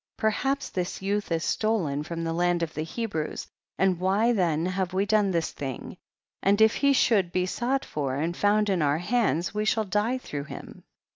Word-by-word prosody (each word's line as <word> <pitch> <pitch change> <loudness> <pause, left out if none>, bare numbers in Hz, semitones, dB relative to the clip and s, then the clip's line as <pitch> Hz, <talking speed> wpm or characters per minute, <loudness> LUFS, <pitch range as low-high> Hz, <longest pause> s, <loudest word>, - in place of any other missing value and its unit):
21. 220 - +2
Perhaps 275 +5 -1
this 180 0 -3
youth 205 -1 -1
is 165 0 0
stolen 185 -11 0
from 165 +2 -5
the 165 0 -1
land 175 0 +1
of 160 - -3
the 155 - -3
Hebrews, 165 -1 -3 0.3
and 185 -2 +2
why 200 +6 +2
then 170 -6 +1
have 185 0 -2
we 195 +2 +1
done 210 -1 +3
this 170 -3 0
thing? 135 -3 -6 0.5
and 200 +2 +3
if 220 0 +6
he 280 -1 +3
should 210 -9 +3
be 180 0 +1
sought 255 +8 -1
for 140 -3 -2
and 165 +5 -1
found 210 +2 +2
in 190 -4 +1
our 145 0 +2
hands 180 - 0
we 210 0 -1
shall 220 +1 +2
die 210 +6 0
through 145 - -6
him. - - -10
185 Hz, 200 wpm, -27 LUFS, 165-215 Hz, 0.5 s, if